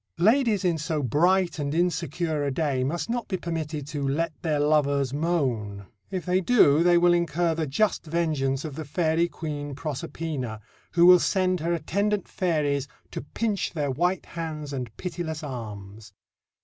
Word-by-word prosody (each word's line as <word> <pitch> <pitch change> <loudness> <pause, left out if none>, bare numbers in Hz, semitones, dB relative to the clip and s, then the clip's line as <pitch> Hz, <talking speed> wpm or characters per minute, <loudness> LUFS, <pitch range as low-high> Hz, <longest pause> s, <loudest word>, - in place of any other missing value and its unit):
Ladies 220 -1 +3
in 170 -3 +1
so 155 -1 -2
bright 170 - +2
and 145 +1 -2
insecure 165 -2 0
a 140 - 0
day 135 -2 0
must 160 +6 -2
not 240 0 -2
be 190 - -2
permitted 155 -4 -4
to 145 -2 -4
"let 155 +4 0
their 155 -3 0
lovers 145 -3 +2
moan." 130 - -1 0.2
If 185 -4 -4
they 185 +1 +2
do, 170 -9 +5
they 175 0 +5
will 175 0 +5
incur 170 0 +1
the 160 -1 -2
just 170 +5 0
vengeance 150 -4 0
of 155 - -5
the 160 - -5
Fairy 160 +3 +1
Queen 145 -4 -5
Proserpina, 140 -4 -4 0.3
who 170 0 +5
will 180 0 +9
send 185 -1 +1
her 165 +2 -1
attendant 200 +5 -1
fairies 145 -6 0 0.2
to - - -4
pinch 205 - -2
their 145 -4 -1
white 175 +7 0
hands 155 -3 -5
and 125 -3 -3
pitiless 170 -4 -4
arms. 105 -6 -8
160 Hz, 160 wpm, -26 LUFS, 140-175 Hz, 0.3 s, will